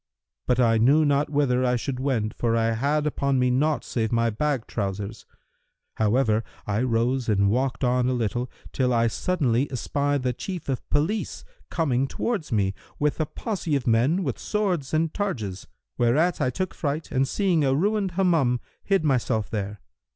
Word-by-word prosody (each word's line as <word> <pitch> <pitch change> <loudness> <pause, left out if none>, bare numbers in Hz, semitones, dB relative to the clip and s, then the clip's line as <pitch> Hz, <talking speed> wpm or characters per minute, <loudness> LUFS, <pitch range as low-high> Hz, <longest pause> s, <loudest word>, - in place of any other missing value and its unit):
But 125 0 +2
I 115 -2 +4
knew 145 +7 +5
not 145 0 +2
whither 140 -4 +2
I 125 0 +2
should 125 +2 -3
wend, 125 -6 0
for 115 -1 0
I 115 0 +2
had 140 +6 0
upon 140 -2 0
me 125 0 +2
naught 145 +4 +1
save 110 -1 -2
my 115 0 +2
bag 135 +2 -1
trousers.[FN#340] 100 +1 -4 0.7
However, 110 0 +2 0.2
I 105 +2 0
rose 125 +1 +1
and 100 -1 +3
walked 130 +3 0
on 125 0 +2
a - - +1
little, 120 +1 -1 0.2
till 125 -2 +1
I 115 0 +3
suddenly 135 0 0
espied 140 +2 -1
the 125 -1 0
Chief 180 - -6
of 130 - -3
Police 180 +9 -1 0.2
coming 135 -5 +1
towards 200 - -3
me, 100 -3 +1 0.2
with 150 +1 0
a 155 - 0
posse 180 -7 -3
of 135 - -1
men 125 +11 +2
with 135 -7 -3
swords 185 -10 -1
and 160 0 +1
targes;[FN#341] 110 - -3 0.3
whereat 150 +9 +2
I 130 - +2
took 185 +7 -3
fright 150 +1 -3
and 135 0 +2
seeing 180 -2 +1
a 135 -1 +2
ruined 200 +3 +1
Hammam 165 -10 +2 0.2
hid 195 -4 +2
myself 125 -6 0
there. 105 -2 -4
130 Hz, 175 wpm, -25 LUFS, 115-150 Hz, 0.7 s, knew